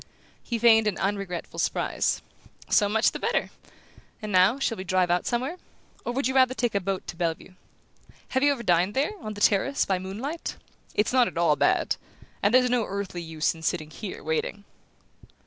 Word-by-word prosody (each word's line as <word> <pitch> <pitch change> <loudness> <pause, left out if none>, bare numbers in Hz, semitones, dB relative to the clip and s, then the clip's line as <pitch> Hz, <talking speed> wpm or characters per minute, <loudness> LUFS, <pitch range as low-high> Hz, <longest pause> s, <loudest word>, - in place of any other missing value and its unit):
He 235 - -3
feigned 225 -1 +5
an 205 - 0
unregretful 195 -3 -3
surprise. - - 0 0.5
"So 205 - +4
much 220 +2 +3
the - - -6
better! - - 0 0.7
And 215 -1 -6
now, 185 +6 +5
shall 230 -6 -1
we - - -4
drive 185 -2 +1
out 175 0 +1
somewhere? 255 +9 -1 0.5
Or - - -2
would 270 +3 -1
you 260 - -1
rather 260 -1 +4
take 240 -1 0
a 200 - +2
boat 195 0 -3
to - - -7
Bellevue? 170 +1 -3 0.8
Have 260 - 0
you 285 +1 +5
ever 260 -4 -3
dined 180 +1 +2
there, 280 +8 +1
on 215 -1 -6
the 205 - -8
terrace, 215 +9 +3
by 190 -2 0
moonlight? 225 - -5 0.4
It's 210 +3 +1
not 250 -2 +5
at - - -7
all 170 -3 +4
bad. - - +2 0.4
And 205 - +3
there's 250 +1 +5
no 245 -3 +1
earthly 195 -3 -4
use 160 -2 -1
in 165 - -13
sitting 155 -1 -2
here 185 +8 -7
waiting." 160 +6 -2
205 Hz, 190 wpm, -26 LUFS, 180-245 Hz, 0.8 s, feigned